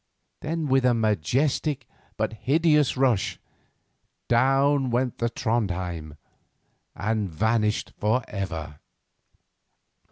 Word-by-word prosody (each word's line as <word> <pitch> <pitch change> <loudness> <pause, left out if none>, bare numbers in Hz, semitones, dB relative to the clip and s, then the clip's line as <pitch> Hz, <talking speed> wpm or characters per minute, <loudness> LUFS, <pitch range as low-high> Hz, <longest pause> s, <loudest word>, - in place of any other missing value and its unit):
Then, 160 +1 -3
with 135 -2 +2
a 125 -1 +4
majestic, 120 - 0 0.3
but 110 +1 -1
hideous 150 +4 +2
rush, 125 -7 +1 0.9
down 135 +2 +3
went 125 +1 -1
the 115 - +1
Trondhjem 90 -10 -2 0.8
and 105 -1 -1
vanished 105 +5 0
for 110 +4 +1
ever. 80 -7 -5
115 Hz, 90 wpm, -25 LUFS, 100-135 Hz, 0.9 s, a